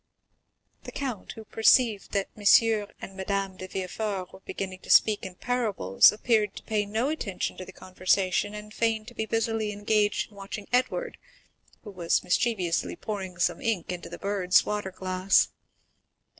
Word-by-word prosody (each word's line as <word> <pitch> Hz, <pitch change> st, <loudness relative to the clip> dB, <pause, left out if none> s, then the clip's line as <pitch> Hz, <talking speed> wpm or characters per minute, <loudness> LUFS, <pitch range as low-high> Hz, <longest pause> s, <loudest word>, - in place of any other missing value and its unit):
The -, -, -9 dB
count, 255 Hz, -8 st, -5 dB
who 220 Hz, -, -11 dB
perceived 225 Hz, -1 st, +3 dB
that 200 Hz, -1 st, 0 dB
M. 210 Hz, -, -12 dB, 0.6 s
and 195 Hz, -, -8 dB
Madame 195 Hz, 0 st, -2 dB
de 185 Hz, -, -7 dB
Villefort 190 Hz, 0 st, -4 dB
were -, -, -12 dB
beginning 190 Hz, -1 st, -6 dB
to -, -, -15 dB
speak 215 Hz, -1 st, +5 dB
in 185 Hz, -1 st, -7 dB
parables, 210 Hz, -, +3 dB
appeared 215 Hz, -1 st, +1 dB
to -, -, -9 dB
pay 210 Hz, -2 st, -1 dB
no 225 Hz, +6 st, 0 dB
attention 235 Hz, -11 st, -3 dB
to 185 Hz, -, -7 dB
the -, -, -11 dB
conversation, 185 Hz, +2 st, 0 dB
and 210 Hz, 0 st, -9 dB
feigned 225 Hz, -1 st, 0 dB
to -, -, -16 dB
be 220 Hz, -2 st, -3 dB
busily 225 Hz, -1 st, 0 dB
engaged 205 Hz, +1 st, 0 dB
in 205 Hz, -, -18 dB
watching 200 Hz, +1 st, -7 dB
Edward, 255 Hz, -, 0 dB, 0.6 s
who 210 Hz, -, -9 dB
was 175 Hz, -3 st, 0 dB
mischievously 180 Hz, -2 st, 0 dB
pouring 190 Hz, -4 st, -5 dB
some 175 Hz, -, 0 dB
ink 225 Hz, -9 st, -1 dB
into 180 Hz, -1 st, -6 dB
the -, -, -7 dB
bird's 195 Hz, -2 st, +2 dB
water 210 Hz, -2 st, -2 dB
glass. 185 Hz, +1 st, +2 dB
205 Hz, 160 wpm, -27 LUFS, 185-220 Hz, 0.6 s, speak